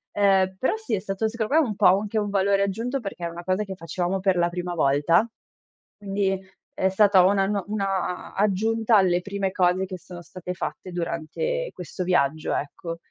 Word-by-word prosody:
Ehm, 190 Hz, -2 st, +3 dB
però 260 Hz, -, +1 dB
sì, 440 Hz, -, -2 dB
è 195 Hz, -, -2 dB
stato 195 Hz, +3 st, -2 dB
secondo 230 Hz, +3 st, -3 dB
me 315 Hz, -, +6 dB
un 210 Hz, -, -3 dB
po' -, -, +5 dB
u -, -, 0 dB
anche 215 Hz, +1 st, -3 dB
un 205 Hz, -1 st, 0 dB
valore 200 Hz, 0 st, +2 dB
aggiunto, 230 Hz, +7 st, -2 dB
perché 195 Hz, -5 st, -6 dB
è -, -, -2 dB
una 170 Hz, +1 st, -8 dB
cosa 185 Hz, +3 st, 0 dB
che 195 Hz, -2 st, -7 dB
facevamo 175 Hz, +2 st, -2 dB
per 190 Hz, -1 st, +1 dB
la 175 Hz, 0 st, +2 dB
prima 180 Hz, 0 st, -4 dB
volta. 160 Hz, +6 st, +3 dB, 0.7 s
Quindi 195 Hz, -1 st, -1 dB, 0.3 s
è 190 Hz, -, +1 dB
stata 195 Hz, -1 st, +5 dB
una 195 Hz, 0 st, +3 dB
nuo 200 Hz, -1 st, -1 dB
una 195 Hz, -3 st, -2 dB
aggiunta 220 Hz, +3 st, +2 dB
alle 180 Hz, -2 st, +3 dB
prime 200 Hz, 0 st, -2 dB
cose 185 Hz, 0 st, +2 dB
che 185 Hz, -1 st, -7 dB
sono 180 Hz, 0 st, -11 dB
state 180 Hz, +1 st, -7 dB
fatte 185 Hz, +1 st, -6 dB
durante 175 Hz, -, -3 dB
questo 180 Hz, +1 st, -6 dB
viaggio, 155 Hz, -4 st, +1 dB
ecco. 165 Hz, +4 st, -4 dB
190 Hz, 190 wpm, -25 LUFS, 180-205 Hz, 0.7 s, me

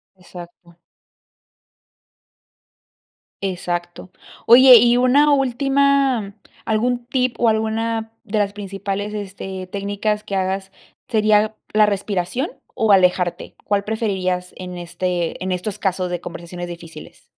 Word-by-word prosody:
Exacto. 175 Hz, -2 st, -13 dB, 2.7 s
Exacto. 175 Hz, -1 st, -4 dB, 0.4 s
Oye 250 Hz, +1 st, +9 dB
y 240 Hz, +2 st, +4 dB
una 260 Hz, +4 st, +4 dB
última, 270 Hz, -4 st, +2 dB, 0.3 s
¿algún 240 Hz, +3 st, 0 dB
tip, 255 Hz, -1 st, 0 dB
o, 235 Hz, -, +4 dB
alguna 225 Hz, +1 st, -1 dB
de 215 Hz, -2 st, -2 dB
las 200 Hz, -1 st, 0 dB
principales, 200 Hz, 0 st, -4 dB
este, 190 Hz, -2 st, -6 dB
técnicas 205 Hz, +2 st, -2 dB
que 205 Hz, -2 st, -5 dB
hagas 190 Hz, 0 st, -2 dB, 0.4 s
sería 215 Hz, 0 st, +2 dB, 0.2 s
la 215 Hz, 0 st, +5 dB
respiración, 200 Hz, -, -2 dB, 0.2 s
o, 220 Hz, -2 st, +1 dB
alejarte? 180 Hz, -2 st, +2 dB
¿Cuál 200 Hz, 0 st, 0 dB
preferirías 190 Hz, -5 st, -2 dB
en 180 Hz, -1 st, -7 dB
este 175 Hz, 0 st, -3 dB
en 185 Hz, -, -2 dB
estos 185 Hz, +3 st, -3 dB
casos 185 Hz, -2 st, -1 dB
de 175 Hz, 0 st, -3 dB
conversaciones 175 Hz, +1 st, -8 dB
difíciles? 170 Hz, -3 st, -11 dB
200 Hz, 110 wpm, -20 LUFS, 180-225 Hz, 2.7 s, Oye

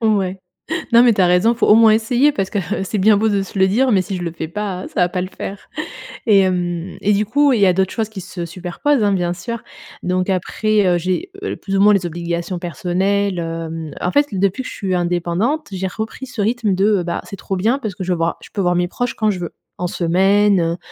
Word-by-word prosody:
Ouais. 195 Hz, -4 st, +1 dB, 0.5 s
Non, 235 Hz, 0 st, +8 dB
mais 245 Hz, -2 st, +6 dB
tu 200 Hz, -, 0 dB
as 185 Hz, -, +5 dB
raison, 180 Hz, +6 st, +4 dB
il 235 Hz, -, -7 dB
faut -, -, +3 dB
au -, -, +7 dB
moins 225 Hz, 0 st, +7 dB
essayer 245 Hz, +6 st, +3 dB
parce 195 Hz, -7 st, -2 dB
que, 205 Hz, -, -1 dB, 0.2 s
heu, -, -, -1 dB
c'est 210 Hz, -, -2 dB
bien 205 Hz, +2 st, +5 dB
beau 220 Hz, +2 st, +2 dB
de 200 Hz, -2 st, +1 dB
se 195 Hz, +1 st, -7 dB
le 190 Hz, -, +5 dB
dire, 250 Hz, +6 st, +2 dB
mais 190 Hz, -3 st, +4 dB
si 195 Hz, -, -5 dB
je 180 Hz, -, -5 dB
le 170 Hz, -, -2 dB
fais 160 Hz, -1 st, -5 dB
pas, 190 Hz, 0 st, -4 dB
ça -, -, -3 dB
va 175 Hz, -, +3 dB
pas 180 Hz, +1 st, -3 dB
le 180 Hz, -, -2 dB
faire. 195 Hz, 0 st, -8 dB, 0.6 s
Et 205 Hz, -3 st, +6 dB
hem, 180 Hz, -1 st, -1 dB
et 210 Hz, -, +3 dB
du 205 Hz, +1 st, +1 dB
coup, 285 Hz, +5 st, +3 dB
il 220 Hz, -, +1 dB
y 200 Hz, -, +7 dB
a 185 Hz, -, +5 dB
d'autres 190 Hz, +1 st, 0 dB
choses 220 Hz, -2 st, -2 dB
qui 220 Hz, -, -8 dB
se 175 Hz, -1 st, -6 dB
superposent, 185 Hz, -, -1 dB
hein, 205 Hz, -, +3 dB
bien 175 Hz, -2 st, 0 dB
sûr. 220 Hz, +6 st, -5 dB, 0.4 s
Donc 185 Hz, +1 st, 0 dB
après, 205 Hz, +3 st, +1 dB
heu, 175 Hz, -, +3 dB
j'ai, 185 Hz, -, -2 dB
heu, -, -, -2 dB
plus 195 Hz, 0 st, -3 dB
ou 195 Hz, -, +3 dB
moins 210 Hz, +1 st, +6 dB
les 195 Hz, -3 st, +1 dB
obligations 170 Hz, +1 st, -3 dB
personnelles. 185 Hz, +3 st, -1 dB
Hem, 165 Hz, -2 st, -5 dB
en 180 Hz, -, 0 dB
fait, 290 Hz, +5 st, +3 dB
depuis 195 Hz, +6 st, 0 dB
que -, -, -7 dB
je -, -, -8 dB
suis 190 Hz, -2 st, -2 dB
indépendante, 175 Hz, -, 0 dB
j'ai 190 Hz, 0 st, -2 dB
repris 220 Hz, +6 st, -5 dB
ce 240 Hz, -4 st, -4 dB
rythme 220 Hz, -1 st, +1 dB
de, 200 Hz, 0 st, +2 dB
bah, 170 Hz, 0 st, -3 dB
c'est 195 Hz, -, -8 dB
trop 195 Hz, -, -4 dB
bien, 225 Hz, +9 st, +1 dB
parce 215 Hz, -8 st, -5 dB
que 190 Hz, -, -5 dB
je 185 Hz, -, -2 dB
voir, 165 Hz, -1 st, -1 dB
je -, -, -13 dB
peux 205 Hz, -, -4 dB
voir 175 Hz, -1 st, +2 dB
mes 175 Hz, 0 st, 0 dB
proches 245 Hz, +5 st, -2 dB
quand 215 Hz, -1 st, +1 dB
je 185 Hz, -, -4 dB
veux. 175 Hz, -2 st, -5 dB, 0.3 s
En 180 Hz, -, -1 dB
semaine, 185 Hz, 0 st, +2 dB
195 Hz, 260 wpm, -19 LUFS, 180-215 Hz, 0.6 s, Non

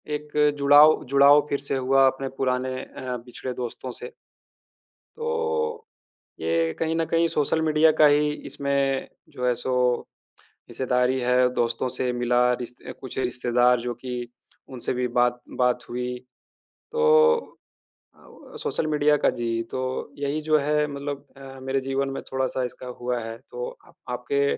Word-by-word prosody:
एक 150 Hz, 0 st, -8 dB, 0.3 s
जुड़ाव 145 Hz, +2 st, +6 dB
जुड़ाव 140 Hz, +1 st, +7 dB
फ़िर 140 Hz, -, 0 dB
से -, -, -2 dB
हुआ 135 Hz, +1 st, +4 dB
अपने 135 Hz, 0 st, -1 dB
पुराने 130 Hz, 0 st, -1 dB
अ, 125 Hz, -1 st, -6 dB
पिछड़े 125 Hz, +1 st, -6 dB
दोस्तों 125 Hz, +1 st, -5 dB
से। 125 Hz, -, -7 dB, 1.1 s
तो 465 Hz, 0 st, -2 dB, 0.6 s
ये 80 Hz, 0 st, 0 dB
कहीं 160 Hz, 0 st, 0 dB
न 165 Hz, 0 st, +1 dB
कहीं 165 Hz, +1 st, +2 dB
सोशल 160 Hz, +1 st, 0 dB
मीडिया 155 Hz, 0 st, +4 dB
का -, -, +9 dB
ही 150 Hz, +1 st, +3 dB, 0.2 s
इसमें 140 Hz, -1 st, -1 dB, 0.2 s
जो 125 Hz, -, -5 dB
है 125 Hz, -, +3 dB
सो 130 Hz, +2 st, -3 dB, 1.0 s
हिस्सेदारी 125 Hz, 0 st, 0 dB
है 125 Hz, +1 st, +3 dB
दोस्तों 120 Hz, +2 st, 0 dB
से 125 Hz, 0 st, -1 dB
मिला, 125 Hz, 0 st, +2 dB
रिस 120 Hz, 0 st, -6 dB
अ, -, -, -5 dB
कुछ 130 Hz, -1 st, -7 dB
रिश्तेदार 125 Hz, -1 st, +2 dB
जो 120 Hz, 0 st, -3 dB
कि 125 Hz, -2 st, -4 dB, 0.4 s
उनसे 130 Hz, -2 st, -3 dB
भी 125 Hz, 0 st, 0 dB
बात 120 Hz, 0 st, +2 dB, 0.2 s
बात 125 Hz, -1 st, +2 dB
हुई। 125 Hz, +1 st, -3 dB, 0.7 s
तो 465 Hz, 0 st, 0 dB, 1.1 s
अ, -, -, -25 dB
व 460 Hz, -, -14 dB
सोशल 155 Hz, -, -1 dB
मीडिया 150 Hz, -1 st, +3 dB
का -, -, +6 dB
जी 115 Hz, -1 st, -1 dB, 0.2 s
तो, 130 Hz, +2 st, -4 dB
यही 145 Hz, +2 st, -2 dB
जो 155 Hz, 0 st, +3 dB
है 150 Hz, +1 st, +1 dB
मतलब 140 Hz, 0 st, -5 dB
अ, 135 Hz, -1 st, -11 dB
मेरे 135 Hz, +1 st, -1 dB
जीवन 135 Hz, +1 st, -1 dB
में -, -, -4 dB
थोड़ा-सा 130 Hz, -1 st, -1 dB
इसका 125 Hz, -, -11 dB
हुआ 125 Hz, 0 st, -1 dB
है। 115 Hz, 0 st, -6 dB
तो 480 Hz, 0 st, -5 dB, 0.2 s
अ, -, -, -19 dB, 0.2 s
आपके 425 Hz, 0 st, 0 dB
130 Hz, 155 wpm, -25 LUFS, 125-150 Hz, 1.1 s, का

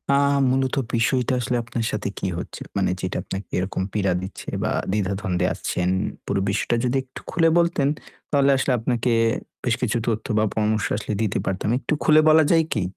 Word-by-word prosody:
আ -, -, +5 dB, 0.3 s
মূলত 130 Hz, +1 st, +1 dB, 0.2 s
বিষয়টা 125 Hz, +2 st, +1 dB
আসলে 125 Hz, 0 st, -1 dB
আপনার 115 Hz, 0 st, -3 dB
সাথে 105 Hz, -, -2 dB
কি -, -, -2 dB
হচ্ছে? -, -, -7 dB, 0.2 s
মানে 95 Hz, -2 st, +2 dB
যেটা 90 Hz, -, -3 dB
আপনাকে 95 Hz, +1 st, -6 dB
এরকম 95 Hz, +1 st, -2 dB
পীড়া 100 Hz, -3 st, +1 dB
দিচ্ছে 95 Hz, -, -8 dB
বা -, -, 0 dB, 0.2 s
দ্বিধাদ্বন্দ্বে 95 Hz, -2 st, 0 dB
আসছেন। 90 Hz, 0 st, -1 dB, 0.4 s
পুরো 100 Hz, -1 st, 0 dB
বিষয়টা 105 Hz, +4 st, 0 dB
যদি 125 Hz, +2 st, +1 dB
একটু 130 Hz, -, -11 dB
খুলে 165 Hz, -2 st, +3 dB
বলতেন, 170 Hz, -5 st, +2 dB, 0.4 s
তাহলে 140 Hz, -1 st, +4 dB
আসলে 135 Hz, 0 st, +1 dB
আপনাকে 120 Hz, +1 st, 0 dB, 0.5 s
বেশ 120 Hz, -, +2 dB
কিছু 120 Hz, -2 st, +1 dB
তথ্য 110 Hz, -1 st, -1 dB
বা 110 Hz, -, +3 dB
পরামর্শ 110 Hz, -1 st, +1 dB
আসলে 105 Hz, -, -4 dB
দিতে 105 Hz, -2 st, 0 dB
পারতাম। 95 Hz, +2 st, -1 dB
একটু 130 Hz, -, -3 dB
খুলে 155 Hz, 0 st, +6 dB
বলা 155 Hz, 0 st, +6 dB
যায় 165 Hz, -1 st, +5 dB
কি? 110 Hz, -, 0 dB
115 Hz, 180 wpm, -23 LUFS, 100-130 Hz, 0.5 s, খুলে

